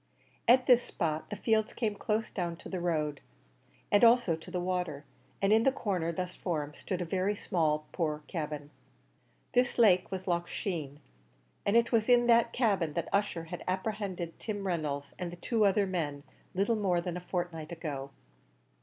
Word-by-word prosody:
At 255 +2 +6
this 245 -1 +6
spot 155 -8 -3
the 210 - -3
fields 220 0 +1
came 220 -3 0
close 215 +2 -1
down 175 -3 -2
to - - -11
the 185 - -3
road, 155 -4 -1 0.7
and 205 +3 +5
also 235 -7 +6
to 160 +3 -11
the 180 0 -2
water, 180 -5 -2 0.4
and 195 +2 +5
in 220 - +6
the 270 - +4
corner 185 -10 -1
thus 180 +2 -4
formed 150 -5 -3
stood 185 -2 -4
a - - -5
very 190 +4 0
small 155 -6 0
poor 155 -3 -2
cabin. 150 -3 -5 0.8
This 250 0 +2
lake 190 -6 +5
was 190 0 -5
Loch 175 -1 0
Sheen, 155 -8 -4 0.7
and 205 +3 +5
it 235 -1 +3
was 225 -1 +2
in 240 -1 +6
that 235 -1 +5
cabin 195 - +1
that 170 +1 -3
Ussher 200 -4 +1
had 165 +1 -7
apprehended 190 -3 -3
Tim 205 -3 -4
Reynolds 150 -6 -2
and 175 -2 -3
the - - -7
two 220 +4 +1
other 200 +1 +3
men, 155 -7 -3 0.3
little 205 +4 +2
more 185 -4 +2
than 175 0 -3
a 180 - -4
fortnight 175 -3 -4
ago. 145 -5 -5
180 Hz, 180 wpm, -31 LUFS, 165-210 Hz, 0.8 s, At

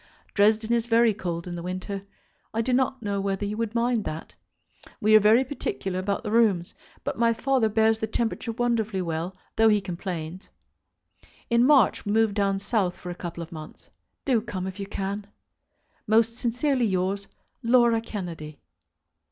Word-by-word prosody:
Dresden 220 +2 +3
is 235 0 +1
very 230 -1 +4
cold 170 -4 -4
in 180 - -6
the 170 - -5
winter. 185 +3 -4 0.5
I 225 - +1
do 255 +2 0
not 260 -1 +1
know 200 -1 -1
whether 195 +1 -1
you 205 +1 -3
would 230 0 -2
mind 235 -1 +1
that. 155 +1 -6 0.7
We 215 +1 +5
are - - +10
very 220 +5 +5
particular 195 -8 -3
about 200 +3 -2
the 210 - -3
rooms, 210 -7 +2 0.3
but - - -3
my 230 -1 +4
father 255 -2 +1
bears 220 +1 +3
the 220 - -1
temperature 230 +1 -2
wonderfully 220 -5 0
well, 170 +2 -3 0.2
though 225 0 +6
he 210 -1 +4
complains. 180 -2 -6 1.0
In 235 0 +5
March 275 -8 +4
we 205 - -1
move 220 -1 +3
down 200 -1 +1
south 200 -3 -1
for 180 - -7
a - - -3
couple 170 -1 -6
of 165 - -12
months. 155 -2 -11 0.3
Do 245 -5 +3
come 190 -5 -5
if 190 +1 -6
you 200 - -4
can. 200 +1 -4 0.8
Most 225 +1 +3
sincerely 250 +1 +1
yours, 190 +1 -1 0.3
LAURA 235 -1 +4
KENNEDY. 170 -9 -6
210 Hz, 170 wpm, -26 LUFS, 185-230 Hz, 1.0 s, are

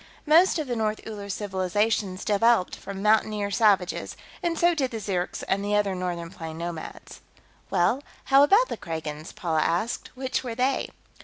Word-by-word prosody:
Most 335 +4 +5
of 310 - -2
the 245 -2 -3
North 215 -1 -1
Uller 205 -2 -7
civilizations 195 0 -1
developed 215 -1 +3
from 195 0 -7
mountaineer 210 -1 +2
savages, 200 -4 +2 0.2
and 340 -1 -1
so 345 0 +4
did 275 -6 0
the 225 - -5
Zirks 185 -4 -3
and 195 +1 0
the 205 +1 0
other 205 -2 +2
northern 175 -2 -4
plains 160 -3 -7
nomads." 170 -1 -7 0.5
"Well, 230 +10 +2 0.2
how 275 0 +5
about 405 +12 +5
the - - -5
Kragans?" 155 -1 -6
Paula 160 -3 -1
asked. 175 +9 -1
"Which 260 0 -2
were 240 -3 -4
they?" 255 +3 0
205 Hz, 165 wpm, -26 LUFS, 180-240 Hz, 0.5 s, Most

